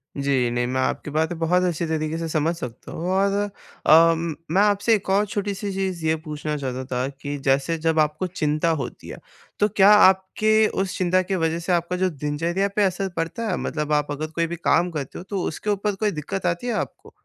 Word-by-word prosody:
जी। 135 Hz, -3 st, +1 dB
नहीं, 120 Hz, 0 st, 0 dB
मैं 130 Hz, +1 st, -1 dB
आपकी 150 Hz, -, -2 dB
बातें 160 Hz, +2 st, 0 dB
बहुत 180 Hz, +3 st, +2 dB
अच्छी 170 Hz, -2 st, 0 dB
तरीके 155 Hz, 0 st, -2 dB
से 165 Hz, 0 st, -3 dB
समझ 160 Hz, +2 st, 0 dB
सकता 125 Hz, -9 st, -8 dB
हूँ। 175 Hz, +3 st, -4 dB
और 195 Hz, +1 st, +2 dB, 0.5 s
अम, 165 Hz, 0 st, +5 dB, 0.2 s
मैं 190 Hz, +4 st, +4 dB
आपसे 205 Hz, +2 st, +3 dB
एक 195 Hz, -2 st, -5 dB
और 200 Hz, +2 st, +3 dB
छोटी-सी 200 Hz, 0 st, -3 dB
चीज़ 190 Hz, -4 st, -3 dB
ये 160 Hz, 0 st, +3 dB
पूछना 150 Hz, 0 st, -4 dB
चाहता 130 Hz, -1 st, -4 dB
था 125 Hz, +2 st, 0 dB
कि 145 Hz, 0 st, -4 dB
जैसे 140 Hz, +5 st, +2 dB
जब 160 Hz, 0 st, +1 dB
आपको 155 Hz, +4 st, +1 dB
चिंता 155 Hz, -2 st, 0 dB
होती 120 Hz, -, -7 dB
है, -, -, -7 dB, 0.4 s
तो 210 Hz, -, +4 dB
क्या 200 Hz, +1 st, +7 dB
आपके 210 Hz, +2 st, +5 dB
उस 185 Hz, -1 st, -3 dB
चिंता 185 Hz, 0 st, +2 dB
के 190 Hz, +1 st, -2 dB
वज़ह 165 Hz, -1 st, 0 dB
से 170 Hz, +2 st, -3 dB
आपका 175 Hz, +1 st, 0 dB
जो 185 Hz, 0 st, +1 dB
दिनचर्या 165 Hz, +6 st, -1 dB
पे 210 Hz, -, +3 dB
असर 190 Hz, 0 st, 0 dB
पड़ता 220 Hz, +8 st, -2 dB
है? 180 Hz, -, 0 dB
मतलब 150 Hz, -1 st, -2 dB
आप 145 Hz, 0 st, +1 dB
अगर 155 Hz, +2 st, -3 dB
कोई 165 Hz, 0 st, 0 dB
भी 170 Hz, -, -4 dB
काम 175 Hz, +1 st, +2 dB
करते 145 Hz, -4 st, -5 dB
हो, 175 Hz, -, -7 dB
तो 195 Hz, -1 st, -3 dB
उसके 210 Hz, +6 st, -4 dB
ऊपर 205 Hz, 0 st, 0 dB
कोई 210 Hz, +1 st, 0 dB
दिक्कत 180 Hz, +5 st, -4 dB
आती 175 Hz, +7 st, -1 dB
है 235 Hz, -, 0 dB
आपको? -, -, -5 dB
170 Hz, 215 wpm, -23 LUFS, 150-195 Hz, 0.5 s, क्या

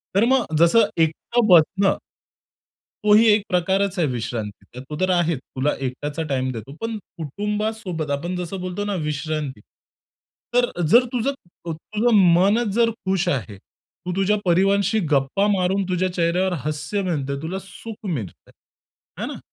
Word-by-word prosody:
तर 205 Hz, +4 st, +5 dB
मग 265 Hz, -2 st, +3 dB
जसं 190 Hz, +7 st, +6 dB, 0.2 s
एकट 160 Hz, +9 st, -3 dB
बसणं 185 Hz, +3 st, +5 dB, 1.1 s
तोही 210 Hz, +2 st, +6 dB
एक 210 Hz, -1 st, +2 dB
प्रकारच 190 Hz, +2 st, +1 dB
आहे 165 Hz, -, +2 dB
विश्रांतीचा. 120 Hz, -2 st, -5 dB
तो 150 Hz, -, -4 dB
तर 185 Hz, -, +2 dB
आहेच, 170 Hz, -5 st, +1 dB
तुला 135 Hz, +2 st, -2 dB
एकटाचा 145 Hz, +5 st, -3 dB
टाईम 130 Hz, -1 st, 0 dB
देतो. 120 Hz, +3 st, -8 dB
पण 225 Hz, -1 st, -3 dB, 0.2 s
कुटुंबासोबत 205 Hz, 0 st, -3 dB
आपण 170 Hz, +6 st, -2 dB
जसं 180 Hz, +1 st, -4 dB
बोलतो 185 Hz, +2 st, -3 dB
ना 205 Hz, -1 st, -2 dB
विश्रांती. 150 Hz, -4 st, -3 dB, 0.9 s
तर 245 Hz, 0 st, +3 dB, 0.2 s
जर 240 Hz, +10 st, +6 dB
तुझं 250 Hz, +2 st, +1 dB
अ, 175 Hz, -9 st, -10 dB
तुझं 215 Hz, +8 st, 0 dB, 0.2 s
मनचं 205 Hz, +6 st, +3 dB
जर 230 Hz, +3 st, +3 dB, 0.2 s
खुश 190 Hz, -1 st, +1 dB
आहे. 110 Hz, -, -2 dB
तू 180 Hz, -, -12 dB
तुझ्या 195 Hz, +2 st, +2 dB
परिवाराशी 195 Hz, +4 st, +3 dB
गप्पा 140 Hz, +8 st, +2 dB
मारून 190 Hz, +1 st, +1 dB
तुझ्या 185 Hz, 0 st, 0 dB
चेहऱ्यावर 180 Hz, +2 st, +1 dB
हास्य 155 Hz, +7 st, -2 dB
मिळतंय 145 Hz, -7 st, -2 dB
तुला 175 Hz, +5 st, -4 dB
सुख 220 Hz, +3 st, -10 dB
मिळतं 115 Hz, -, -5 dB
आहे. -, -, -20 dB, 0.7 s
आहे -, -, -2 dB
ना. -, -, -9 dB
180 Hz, 145 wpm, -22 LUFS, 150-205 Hz, 1.1 s, जसं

